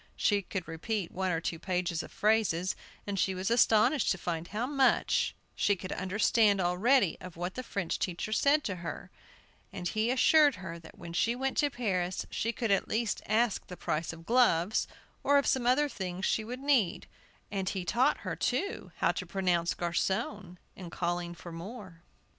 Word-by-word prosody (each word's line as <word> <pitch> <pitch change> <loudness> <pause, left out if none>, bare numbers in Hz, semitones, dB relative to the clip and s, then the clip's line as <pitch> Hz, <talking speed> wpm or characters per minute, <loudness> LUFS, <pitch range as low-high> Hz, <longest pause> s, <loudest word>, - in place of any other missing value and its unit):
She 205 -1 +2
could 185 -2 -5
repeat 175 +3 -3
one 190 0 -1
or 165 -2 0
two 165 -1 -3
pages 180 -2 -1
of - - -10
phrases, 205 -5 +1 0.3
and 200 -1 -3
she 190 0 +1
was 185 +4 -2
astonished 235 +4 +4
to 195 - 0
find 170 -1 -3
how 215 +6 -2
much 275 -1 +2 0.2
she 205 - +2
could 185 0 -7
understand 205 +2 +2
already 190 +4 +2
of 180 -2 -9
what 180 +2 -3
the 255 - -4
French 200 -8 -3
teacher 185 +3 -3
said 285 +5 +3
to 195 -3 -3
her; 170 -3 -7 0.6
and 175 - -4
he 215 +2 0
assured 290 +2 +5
her 180 -2 -7
that 160 - -15
when 170 - -9
she 230 +7 +1
went 265 +1 -2
to 290 - +3
Paris 185 -8 -2
she 230 - -1
could 230 -2 -2
at 195 - +2
least 225 -2 -1
ask 220 0 +1
the 180 - -8
price 155 +1 -2
of 165 0 -12
gloves, 220 -5 +3 0.4
or 285 0 +4
of 280 - +2
some 250 -2 +1
other 280 +4 +4
things 190 -7 -4
she 220 - +1
would 250 +4 -6
need, 270 -10 +2 0.5
and 195 -2 -1
he 190 -3 -3
taught 240 +8 +2
her, - - -3
too, 325 +11 -2
how - - +4
to - - -5
pronounce 180 -3 0
"garçon," 180 +2 -2 0.2
in 180 -3 -8
calling 175 0 -2
for 170 +1 -10
more. 180 0 -9
195 Hz, 185 wpm, -30 LUFS, 175-235 Hz, 0.6 s, assured